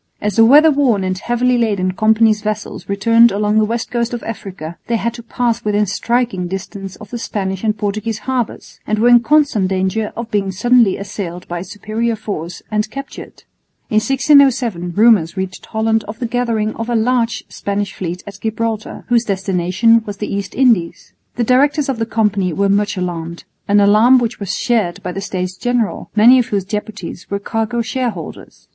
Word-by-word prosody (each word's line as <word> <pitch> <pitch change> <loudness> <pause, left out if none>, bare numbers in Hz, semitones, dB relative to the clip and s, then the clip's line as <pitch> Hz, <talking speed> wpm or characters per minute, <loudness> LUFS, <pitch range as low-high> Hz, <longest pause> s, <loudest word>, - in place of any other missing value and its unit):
As 210 -2 -2
the 225 - +7
weather 300 +6 +7
worn 255 -9 +2
and 185 0 -1
heavily 240 +5 0
laden 200 -5 0
Company's 220 +2 +3
vessels 215 -1 -5
returned 230 +4 +4
along 210 +1 +1
the 215 - +3
west 230 +2 -3
coast 240 0 -1
of 235 - -7
Africa, 185 -7 -7
they 235 - 0
had 230 +1 -1
to 235 - -9
pass 235 0 -2
within 210 0 +1
striking 230 -2 -1
distance 195 +1 -6
of 210 - -13
the 240 - -4
Spanish 190 -3 -3
and 215 -1 0
Portuguese 210 +2 -2
harbours 255 -4 -3
and 215 - 0
were 235 +3 +4
in 240 0 +8
constant 255 -6 +2
danger 190 +3 -1
of 235 0 -5
being 200 -2 0
suddenly 230 +1 +3
assailed 180 -3 -6
by 175 0 -4
a - - -5
superior 215 +4 -3
force 180 -6 -6
and 215 0 0
captured. 275 +4 -9 0.5
In 215 - +2
1607 250 - +3
rumours 205 -5 +4
reached 190 -1 -5
Holland 220 0 0
of 210 +1 -7
the 250 - -3
gathering 230 -3 -1
of 230 +1 -4
a 240 - 0
large 230 0 +1
Spanish 200 -1 -3
fleet 180 0 -5
at 200 -1 -10
Gibraltar, 225 0 -3
whose 240 -1 +3
destination 195 +3 +2
was 205 -1 -5
the 210 - -4
East 200 -1 -4
Indies. 230 -10 +1 0.2
The 240 - 0
directors 275 +4 +2
of 260 -4 -2
the 225 - -1
Company 205 -6 0
were 200 +4 +1
much 205 0 +1
alarmed, 170 -2 -4 0.2
an 205 +1 +4
alarm 215 +6 +5
which 240 -1 -2
was 200 -2 -3
shared 220 -8 0
by 180 - -3
the 195 - -5
States 185 -2 -4
General, 245 0 -2
many 240 +5 +7
of 245 - 0
whose 200 -6 -2
deputies 210 -3 -6
were 200 - -1
cargo 225 +3 -2
shareholders. 225 -7 -5
215 Hz, 185 wpm, -17 LUFS, 195-235 Hz, 0.5 s, in